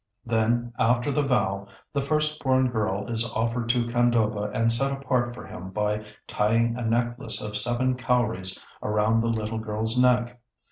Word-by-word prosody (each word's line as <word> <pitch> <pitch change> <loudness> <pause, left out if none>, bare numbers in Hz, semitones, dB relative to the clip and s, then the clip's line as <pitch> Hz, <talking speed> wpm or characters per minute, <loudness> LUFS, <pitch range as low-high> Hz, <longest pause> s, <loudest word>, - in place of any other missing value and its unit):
Then 120 +1 +1
after 120 +4 +2
the 150 - +1
vow, 100 -8 0 0.3
the 140 - +1
first 150 +2 0
born 130 -1 +3
girl 105 -3 -1
is 115 -1 0
offered 115 +1 -1
to 120 0 +2
Khandoba 115 -3 +1
and 115 +1 +2
set 135 +4 +1
apart 125 -3 -1
for - - -9
him 95 +1 -8
by 105 +2 -1 0.2
tying 115 +2 +1
a 125 - -4
necklace 120 +3 0
of 105 0 -5
seven 120 +4 0
cowries 115 -7 -1 0.2
around 105 +2 +2
the 115 - 0
little 110 -1 -2
girl's 110 +2 0
neck. 125 -1 +2
115 Hz, 160 wpm, -26 LUFS, 110-125 Hz, 0.3 s, born